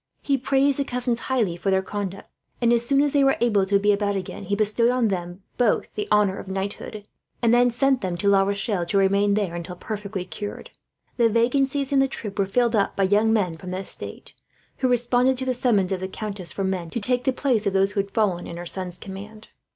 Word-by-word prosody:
He 280 - +2
praised 275 +1 +1
the - - +2
cousins 245 -2 -2
highly 225 -10 +1
for 185 +3 -2
their 190 0 +2
conduct 200 -1 -5 0.3
and, 235 -1 +3
as 235 0 +2
soon 275 +3 +3
as 290 - +1
they 280 -1 +3
were 270 0 +3
able 210 -5 +2
to 200 +1 +3
be 205 +1 +3
about 205 0 0
again, 190 -2 -5
he 200 - 0
bestowed 215 +3 +2
on 190 -7 -1 0.2
both 240 -3 +1
the 210 - -3
honour 210 -2 +3
of - - -9
knighthood; 200 +2 -4 0.4
and 235 0 +4
then 245 0 +5
sent 265 +1 +1
them 180 -3 -2
to 200 - -1
La 200 -1 +5
Rochelle, 200 -1 -1
to 200 - +1
remain 200 +1 +3
there 200 -5 -1
until 175 +1 -6
perfectly 200 -1 -5
cured. 205 +2 -7 0.5
The 235 -2 +4
vacancies 270 +5 +1
in 275 - +4
the 270 - +4
troop 210 -6 -7
were 195 - +2
filled 235 +3 +2
up 200 -2 +1
by 195 - +1
young 210 +3 +3
men 185 -7 +1
from 185 - -9
the 185 - -3
estate, 190 - -5 0.4
who 260 - +1
responded 245 +1 +2
to 260 - -3
the 255 - +1
summons, 210 -7 +1
of 190 - -1
the 190 - -3
countess, 195 -2 -5
for 195 - -3
men 185 -3 -2
to 235 - -3
take 250 +3 +1
the 265 - +3
place 250 -5 0
of 195 - 0
those 195 +1 +3
who 205 - -2
had 200 0 -1
fallen 195 -4 0
in 170 - -7
her 175 - -6
son's 180 0 -4
command. 210 +2 -10
205 Hz, 235 wpm, -24 LUFS, 195-245 Hz, 0.5 s, then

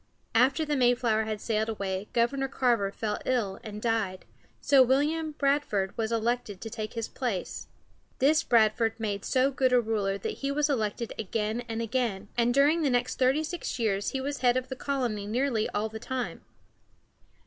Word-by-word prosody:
After 265 +7 +3
the 295 -1 0
Mayflower 240 -4 +2
had 215 -1 -3
sailed 220 0 -1
away 195 -2 -3
Governor 270 +3 +1
Carver 240 -7 +1
fell 210 0 -3
ill 220 -7 -1
and 210 -1 -7
died, 220 -5 -1 0.3
so 275 -2 +5
William 300 +5 +2
Bradford 275 -10 0
was 225 0 -2
elected 230 -3 -1
to 225 - -7
take 215 0 -5
his 230 -1 -3
place. 235 -9 -4 0.5
This 300 +4 +4
Bradford 225 0 +2
made 205 -3 -2
so 260 +1 +2
good 260 -1 +2
a 250 - +5
ruler 210 -4 -1
that 200 - -4
he 275 - -2
was 295 +1 +1
elected 225 -2 -2
again 220 +2 -2
and 225 0 -2
again, 225 -4 -2
and 240 0 +2
during 285 +6 +4
the 295 - +2
next 245 0 0
thirty 265 +4 +3
six 335 -2 -4
years 205 -4 0
he 270 - -3
was 280 +2 -3
head 250 0 +3
of 255 0 -3
the 260 - -4
colony 245 -7 -2
nearly 235 0 0
all 210 +1 -1
the 220 0 -8
time. 255 +2 -4
235 Hz, 180 wpm, -28 LUFS, 215-265 Hz, 0.5 s, so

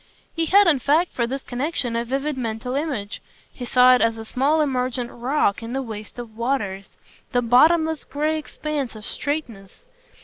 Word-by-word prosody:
He 330 -1 -1
had 405 +4 +6
in 315 -6 +4
fact 305 +8 +2
for 235 -2 0
this 270 +2 -4
connexion 250 -2 -3
a 235 - 0
vivid 270 +4 -2
mental 235 0 -4
image 270 -8 -3 0.3
he 245 - -7
saw 250 +1 +6
it 250 - +3
as 225 0 +2
a 225 - -7
small 275 +7 +1
emergent 250 -4 -1
rock 240 -4 0
in 230 +1 -6
the 270 - -1
waste 215 -2 -8
of 235 -3 -8
waters, 215 -6 -2 0.4
the 245 0 +2
bottomless 315 +6 +4
grey 305 +2 -1
expanse 300 -5 -4
of 215 -1 -10
straightness. 285 - -5
255 Hz, 175 wpm, -23 LUFS, 230-300 Hz, 0.4 s, had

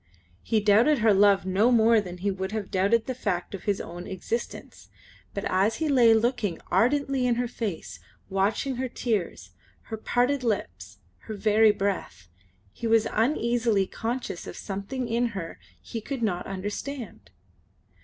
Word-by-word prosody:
He 220 - +1
doubted 215 +8 +4
her 220 -3 +4
love 200 -1 +4
no 200 +6 +3
more 230 -1 +5
than 180 -2 -8
he 200 +3 -1
would 190 +1 -4
have 215 -3 -4
doubted 200 +5 +2
the 260 - -3
fact 200 -8 -3
of 195 - -7
his 200 -2 0
own 175 +1 -7
existence, 210 +5 -5 0.5
but 200 - -3
as 195 +4 +2
he 320 - -1
lay 250 -5 +5
looking 220 -6 0
ardently 265 +5 +2
in 240 - +2
her 245 +1 -1
face, 180 - -5 0.3
watching 205 +7 0
her 260 0 -2
tears, 195 - -3 0.4
her - - -2
parted 250 +5 0
lips, 95 - -3 0.3
her 220 - -4
very 215 +1 +4
breath, 180 - -3 0.4
he 230 - -5
was 225 -1 +4
uneasily 235 -4 +1
conscious 230 -2 -4
of - - -8
something 210 +6 -4
in 235 +1 +1
her 165 -3 -6 0.2
he 225 - -6
could 265 +1 -4
not 180 -5 -1
understand. 205 - -6
215 Hz, 155 wpm, -26 LUFS, 190-240 Hz, 0.5 s, more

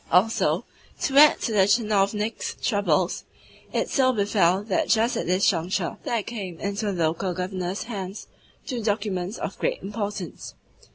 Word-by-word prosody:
Also, 195 +6 +3 0.4
to 270 - -1
add 300 +1 +8
to - - -1
the 195 -3 +4
tchinovniks' 210 0 0
troubles, 185 -5 +1 0.5
it - - 0
so 260 -2 +3
befell 200 -4 +2
that 210 -3 0
just 230 +2 +2
at - - -2
this 185 +2 +2
juncture 175 0 0
there 230 -3 0
came 195 -8 -6
into 200 +1 -2
the 175 -3 -1
local 170 +3 -1
Governor's 185 +1 -3
hands 200 -4 -6 0.4
two 250 -4 -3
documents 205 -2 -2
of - - -5
great - - -1
importance. 205 -3 -5
200 Hz, 150 wpm, -25 LUFS, 185-220 Hz, 0.5 s, add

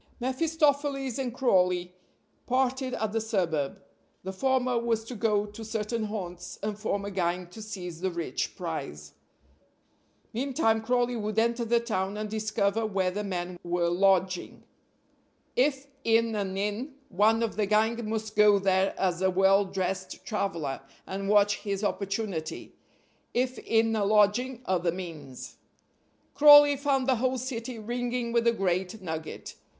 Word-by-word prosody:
mephistopheles 280 -1 0
and 255 -2 -2
Crawley 180 -8 +2 0.5
parted 260 0 0
at 220 -3 -2
the 225 +1 0
suburb; 185 -6 -1 0.4
the 190 +1 -5
former 255 +2 +1
was 230 -1 0
to 230 - -8
go 210 -2 +1
to 210 +2 -9
certain 220 +1 -2
haunts 180 -4 -6
and 210 0 -2
form 200 -2 -2
a 200 - -4
gang 180 -1 -1
to 180 +6 -12
seize 180 -6 -7
the 190 - 0
rich 170 -7 -3
prize. 75 0 -6 1.2
Meantime 240 -2 +1
Crawley 245 +1 +1
would 215 -1 -3
enter 235 +1 +2
the 235 +1 +2
town 205 -4 -2
and 210 0 -4
discover 215 0 0
where 190 -4 0
the 205 +3 -3
men 180 -2 -4
were 175 0 0
lodging. 185 0 +1 0.9
If 270 +1 +2 0.2
in 230 0 +3
an 195 -2 -2
inn, 210 +8 -3
one 220 +4 +3
of 225 - -2
the 210 -2 0
gang 220 +2 +1
must 220 -1 -3
go 210 -1 +6
there 190 0 +2
as 185 -2 0
a 190 - +3
well 195 +2 +4
dressed 190 0 -4
traveler, 170 - -2 0.2
and 195 +1 -4
watch 205 0 +4
his 200 0 -4
opportunity. 195 -5 -3 0.6
If 250 0 0
in 225 0 +2
a 210 - +1
lodging, 215 +5 +2
other 180 -2 +1
means. 160 -7 -8 0.8
Crawley 290 -1 +8
found 275 -2 +1
the 260 -2 +2
whole 255 +2 0
city 250 -1 -5
ringing 240 +2 -3
with 235 0 +2
the 235 - +5
great 190 0 -1
nugget. 160 -4 -6
210 Hz, 145 wpm, -28 LUFS, 190-235 Hz, 1.2 s, Crawley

